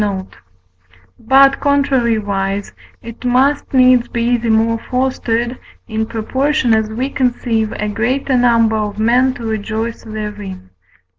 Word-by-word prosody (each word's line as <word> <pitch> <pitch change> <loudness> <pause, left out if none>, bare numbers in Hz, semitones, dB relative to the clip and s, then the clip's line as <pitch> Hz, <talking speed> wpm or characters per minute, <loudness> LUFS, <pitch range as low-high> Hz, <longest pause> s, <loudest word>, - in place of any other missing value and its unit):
note); 195 -2 -4 0.8
but, 270 +3 +4
contrariwise, 220 -8 0 0.3
it 230 +1 -10
must 265 +4 +1
needs 255 -2 +4
be 235 +1 0
the 235 -1 -2
more 225 +1 +2
fostered, 245 -1 -1 0.3
in 220 -1 -2
proportion 260 +3 0
as 220 -1 +1
we 240 +5 -2
conceive 240 -5 -1
a 210 - -3
greater 250 +6 -1
number 230 -3 +3
of 210 -1 -3
men 245 +4 +3
to 245 -3 -8
rejoice 220 +1 -3
therein. 210 - -7
230 Hz, 125 wpm, -16 LUFS, 220-255 Hz, 0.8 s, but